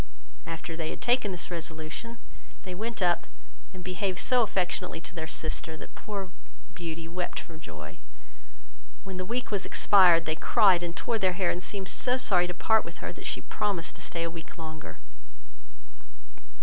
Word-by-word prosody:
After 165 Hz, 0 st, -4 dB
they 160 Hz, -1 st, -2 dB
had -, -, -5 dB
taken 240 Hz, -3 st, +3 dB
this 180 Hz, 0 st, -2 dB
resolution, 165 Hz, +7 st, -4 dB, 0.5 s
they 185 Hz, -, -5 dB
went 220 Hz, +2 st, -2 dB
up, 175 Hz, -1 st, +3 dB, 0.4 s
and 185 Hz, -1 st, -9 dB
behaved 185 Hz, 0 st, -1 dB
so 250 Hz, -1 st, +4 dB
affectionately 180 Hz, -4 st, 0 dB
to 170 Hz, -, -9 dB
their 160 Hz, -2 st, -4 dB
sister, 160 Hz, 0 st, -1 dB
that -, -, -10 dB
poor 195 Hz, -3 st, -5 dB, 0.4 s
Beauty 165 Hz, -1 st, -5 dB
wept 175 Hz, +1 st, -3 dB
for 165 Hz, -, -10 dB
joy. 80 Hz, -, -9 dB, 1.0 s
When 190 Hz, -2 st, -6 dB
the 185 Hz, -, -2 dB
week 245 Hz, 0 st, -1 dB
was 200 Hz, -2 st, +1 dB
expired, 175 Hz, -5 st, +6 dB
they 155 Hz, -, +1 dB
cried 185 Hz, +1 st, +5 dB
and 170 Hz, -1 st, -4 dB
tore 230 Hz, -2 st, 0 dB
their 185 Hz, -2 st, +3 dB
hair, 180 Hz, -1 st, +2 dB
and 175 Hz, -, -3 dB
seemed 195 Hz, 0 st, -3 dB
so 250 Hz, +5 st, +3 dB
sorry 180 Hz, -8 st, +4 dB
to 180 Hz, -, -3 dB
part 220 Hz, +4 st, +4 dB
with -, -, -9 dB
her, -, -, -5 dB
that -, -, -7 dB
she -, -, -1 dB
promised 200 Hz, -5 st, -1 dB
to -, -, -9 dB
stay 170 Hz, -, -2 dB
a 165 Hz, -, -1 dB
week 165 Hz, +1 st, -9 dB
longer. 155 Hz, -1 st, -7 dB
180 Hz, 175 wpm, -29 LUFS, 165-200 Hz, 1.0 s, expired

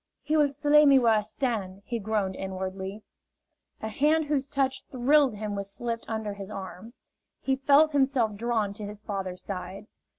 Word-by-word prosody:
"He 305 Hz, +2 st, 0 dB
will 295 Hz, -2 st, +4 dB
slay 290 Hz, +1 st, +4 dB
me 275 Hz, -1 st, +7 dB
where 235 Hz, -3 st, +4 dB
I 215 Hz, -, +3 dB
stand!" 210 Hz, -4 st, -3 dB
he 235 Hz, -1 st, -3 dB
groaned 200 Hz, -3 st, -1 dB
inwardly. 190 Hz, +2 st, -5 dB, 0.8 s
A -, -, -1 dB
hand 300 Hz, +8 st, +2 dB
whose 285 Hz, -2 st, -1 dB
touch 270 Hz, -2 st, -1 dB
thrilled 265 Hz, 0 st, +3 dB
him 210 Hz, 0 st, -4 dB
was 200 Hz, 0 st, -3 dB
slipped 230 Hz, +2 st, -3 dB
under 220 Hz, -2 st, -3 dB
his 200 Hz, -1 st, -8 dB
arm. 195 Hz, +3 st, -8 dB, 0.5 s
He 265 Hz, -, 0 dB
felt 285 Hz, +3 st, +4 dB
himself 265 Hz, -6 st, +2 dB
drawn 220 Hz, -1 st, -1 dB
to 210 Hz, +1 st, -8 dB
his 210 Hz, 0 st, -10 dB
father's 190 Hz, -3 st, -5 dB
side. 190 Hz, +1 st, -6 dB
220 Hz, 170 wpm, -27 LUFS, 200-270 Hz, 0.8 s, me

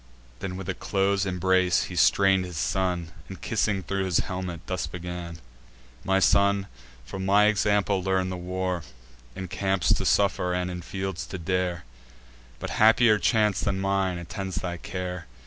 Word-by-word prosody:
Then 90 Hz, -1 st, -5 dB
with 95 Hz, -2 st, -7 dB
a 95 Hz, -, -1 dB
close 100 Hz, +1 st, 0 dB
embrace 90 Hz, -1 st, +2 dB
he 90 Hz, -, -7 dB
strain'd 95 Hz, +1 st, +4 dB
his 90 Hz, -3 st, -7 dB
son, 90 Hz, -1 st, -1 dB, 0.2 s
And, 95 Hz, -, -8 dB
kissing 105 Hz, -3 st, 0 dB
thro' 100 Hz, +3 st, -2 dB
his 90 Hz, -3 st, +1 dB
helmet, 90 Hz, -3 st, -5 dB
thus 95 Hz, -, -2 dB
begun: 90 Hz, -1 st, -6 dB, 0.7 s
"My 95 Hz, 0 st, +2 dB
son, 100 Hz, 0 st, +3 dB, 0.4 s
from 95 Hz, +10 st, -6 dB
my 100 Hz, +2 st, +5 dB
example 105 Hz, -2 st, +2 dB
learn 95 Hz, 0 st, 0 dB
the -, -, -3 dB
war, 90 Hz, 0 st, -3 dB, 0.5 s
In 95 Hz, -, -5 dB
camps 95 Hz, 0 st, +1 dB
to -, -, -1 dB
suffer, 90 Hz, -2 st, +2 dB
and 90 Hz, 0 st, -2 dB
in 90 Hz, 0 st, -5 dB
fields 95 Hz, 0 st, -4 dB
to -, -, -6 dB
dare; 90 Hz, 0 st, -1 dB, 0.7 s
But -, -, -6 dB
happier 110 Hz, 0 st, +6 dB
chance 105 Hz, -4 st, +2 dB
than 95 Hz, -, -1 dB
mine 95 Hz, -2 st, 0 dB
attend 95 Hz, +2 st, -5 dB
thy 90 Hz, 0 st, -3 dB
care! 90 Hz, -2 st, -5 dB
95 Hz, 160 wpm, -26 LUFS, 90-95 Hz, 0.7 s, happier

